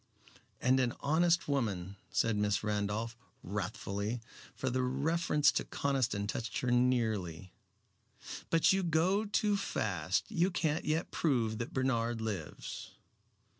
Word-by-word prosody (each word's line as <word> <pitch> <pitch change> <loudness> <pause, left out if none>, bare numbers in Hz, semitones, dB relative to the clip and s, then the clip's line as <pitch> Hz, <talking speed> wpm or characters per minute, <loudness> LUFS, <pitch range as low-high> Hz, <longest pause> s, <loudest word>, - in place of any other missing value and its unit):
"And 130 +1 +3
an 125 -2 +1
honest 170 +4 +3
woman," 100 -10 -1
said 115 -1 +1
Miss 105 +1 +1
Randolph, 105 +2 -1 0.3
wrathfully, 100 +3 -3 0.4
for 130 - -2
the 130 +1 +1
reference 150 +4 +2
to - - 0
Conniston 130 -7 0
touched 110 +2 -3
her 125 - 0
nearly; 110 -9 +1 1.0
"but 165 +3 +4
you 195 - +2
go 180 +5 +2
too 210 0 +2
fast. 95 - -1
You 175 +3 +2
can't 160 -4 0
yet 155 +2 0
prove 120 -8 +1
that 120 - -4
Bernard 120 -3 0
lives." 105 -8 -5
120 Hz, 125 wpm, -33 LUFS, 105-155 Hz, 1.0 s, but